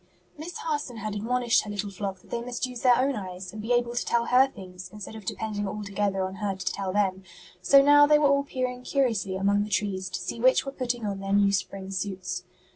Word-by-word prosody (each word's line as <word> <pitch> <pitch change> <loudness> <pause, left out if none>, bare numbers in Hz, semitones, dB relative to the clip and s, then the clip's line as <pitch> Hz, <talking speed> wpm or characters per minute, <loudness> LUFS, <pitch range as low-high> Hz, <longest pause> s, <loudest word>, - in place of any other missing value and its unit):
_ - - -36 0.4
Miss 325 +2 -6
Harson 290 -6 -3
had 215 -1 -4
admonished 235 +3 +2
her 210 - -9
little 205 0 -3
flock 195 -1 -5
that - - -22
they 235 - -2
must 245 +1 -3
use 250 -2 -7
their 250 -2 +5
own 270 +1 +1
eyes 185 -2 -7
and 215 - -6
be 225 +3 -4
able 240 0 +2
to 240 - -1
tell 235 0 +1
her 255 +3 +5
things 185 -6 -10
instead 210 +1 -8
of 215 -3 -10
depending 205 0 -3
altogether 200 -1 -2
on 190 +1 -6
her 205 -2 -2
to 190 0 -3
tell 195 -2 -3
them; 190 -1 +1 0.4
so 275 +7 +6
now 290 +1 +7
they 300 0 +6
were 300 - +2
all 280 0 +3
peering 255 -2 -3
curiously 230 -9 0
among 200 +2 +2
the 210 - -6
trees 190 -2 -1
to - - -4
see - - -5
which 255 +3 +4
were 275 - -4
putting 245 -4 -3
on 200 -1 -3
their 195 0 -3
new 200 0 +4
spring 190 0 -3
suits. 190 -1 -4
210 Hz, 240 wpm, -27 LUFS, 195-250 Hz, 0.4 s, now